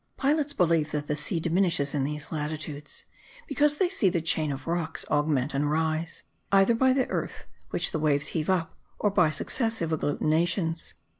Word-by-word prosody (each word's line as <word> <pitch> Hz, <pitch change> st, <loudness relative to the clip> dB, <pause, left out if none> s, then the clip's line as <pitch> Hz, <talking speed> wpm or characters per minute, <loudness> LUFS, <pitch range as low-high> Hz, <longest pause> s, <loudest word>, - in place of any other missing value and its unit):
Pilots 290 Hz, +1 st, +1 dB
believe 165 Hz, -, +2 dB
that 150 Hz, -1 st, -2 dB
the 150 Hz, -, -1 dB
sea 155 Hz, +4 st, -1 dB
diminishes 165 Hz, -4 st, +1 dB
in 145 Hz, -3 st, 0 dB
these 150 Hz, +1 st, -4 dB
latitudes, 150 Hz, -1 st, -4 dB, 0.4 s
because 295 Hz, +1 st, +3 dB
they 370 Hz, -, +3 dB
see 345 Hz, -, +2 dB
the 170 Hz, -, 0 dB
chain 155 Hz, -2 st, +1 dB
of 135 Hz, -1 st, -6 dB
rocks 165 Hz, -1 st, -2 dB
augment 145 Hz, -2 st, +1 dB
and 145 Hz, +1 st, 0 dB
rise, 160 Hz, +1 st, -1 dB, 0.3 s
either 195 Hz, +3 st, +5 dB
by 260 Hz, +3 st, +3 dB
the 260 Hz, -1 st, +1 dB
earth -, -, -4 dB, 0.2 s
which -, -, +1 dB
the 160 Hz, -, -2 dB
waves 145 Hz, -2 st, +2 dB
heave 155 Hz, 0 st, -2 dB
up, 180 Hz, -4 st, 0 dB, 0.2 s
or 205 Hz, -, +1 dB
by 180 Hz, -5 st, +4 dB
successive 225 Hz, -, -1 dB
agglutinations. 165 Hz, +3 st, 0 dB
160 Hz, 170 wpm, -27 LUFS, 150-195 Hz, 0.4 s, either